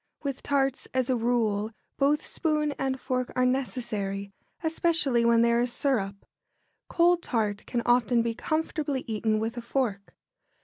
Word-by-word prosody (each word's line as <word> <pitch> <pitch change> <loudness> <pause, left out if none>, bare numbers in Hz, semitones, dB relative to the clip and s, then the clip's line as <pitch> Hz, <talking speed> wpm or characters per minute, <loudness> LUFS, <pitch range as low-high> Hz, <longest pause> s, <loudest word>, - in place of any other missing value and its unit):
With 275 -2 -3
tarts, 275 -2 0
as 260 0 +2
a - - +3
rule, 225 -3 +1 0.3
both 290 +2 +2
spoon 305 -2 0
and 265 -1 -1
fork 255 -1 -2
are 255 - +3
necessary, 210 -6 -2 0.3
especially 320 -6 +2
when 235 0 +5
there 235 0 +3
is 245 0 0
syrup. 200 -8 -1 0.6
Cold 345 0 +3
tart 210 -7 -1
can 235 -1 -1
often 240 -1 +3
be 230 -1 -1
comfortably 300 0 -2
eaten 220 -1 0
with 225 +2 -2
a - - -3
fork. 235 -5 -2
245 Hz, 145 wpm, -27 LUFS, 225-275 Hz, 0.6 s, when